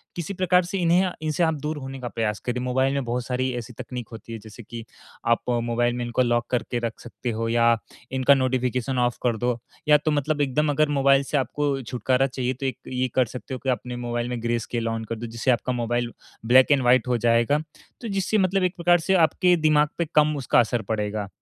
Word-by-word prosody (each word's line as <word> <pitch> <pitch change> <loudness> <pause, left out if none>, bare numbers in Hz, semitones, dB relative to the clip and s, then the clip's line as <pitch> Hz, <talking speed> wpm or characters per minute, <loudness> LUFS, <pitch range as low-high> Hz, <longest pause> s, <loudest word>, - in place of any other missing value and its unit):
किसी 175 +3 -4
प्रकार 180 -1 +3
से 190 +3 -3
इन्हें 180 +1 +3
इनसे 155 +2 0
आप 160 -1 +2
दूर 150 +1 -3
होने 135 -1 -7
का 125 - -5
प्रयास 110 -3 -2
करें। 125 0 -1
मोबाइल 130 +2 +1
में 140 -1 -1
बहुत 120 +1 -2
सारी 130 +1 -1
ऐसी 120 0 -6
तकनीक 125 0 -7
होती 115 0 -9
हैं, 115 - -6
जैसे 110 +2 -12
कि 115 +2 -8 0.4
आप 115 0 +3 0.2
मोबाइल 120 +1 +1
में 125 - -3
इनको 120 +2 0
लॉक 120 -1 +1
करके 120 0 -1
रख 115 -2 -4
सकते 120 +1 -6
हो 115 +1 -2
या 115 0 +4 0.4
इनका 130 +1 +4
नोटिफ़िकेशन 130 -1 0
ऑफ 120 -1 +1
कर 120 -3 +1
दो। 120 +1 0 0.3
या 150 0 +7
तो 155 +1 -1
मतलब 150 +1 0
एकदम 145 +2 +1
अगर 155 +1 +2
मोबाइल 140 -1 +4
से 145 - -1
आपको 140 0 -1
छुटकारा 125 +2 0
चाहिए, 130 -1 -2
तो 135 +2 -6
एक 130 - -2
ये 130 0 -1
कर 130 - +4
सकते 125 +3 -8
हो 130 - -4
कि 135 - -1
आप 125 - +2
अपने 125 0 -7
मोबाइल 120 0 -3
में 120 -2 -4
ग्रे 120 0 0
स्केल 115 0 -3
ऑन 115 0 -2
कर 115 - -4
दो, 115 +2 -6
जिससे 115 +3 0
आपका 125 +1 0
मोबाइल 120 0 -1 0.3
ब्लैक 130 +4 +6
एंड 140 - +4
व्हाइट 125 -1 +3
हो 125 -1 +1
जाएगा। 120 +5 +2 0.4
तो 235 - -5
जिससे 195 +1 0
मतलब 190 0 +2
एक 180 0 0
प्रकार 175 0 +3
से 190 +4 0
आपके 180 +2 +2
दिमाग 150 -1 +4
पे 170 - 0
कम 150 0 +4
उसका 130 - +2
असर 120 0 +1
पड़ेगा। 105 -2 -3
125 Hz, 235 wpm, -24 LUFS, 120-145 Hz, 0.4 s, या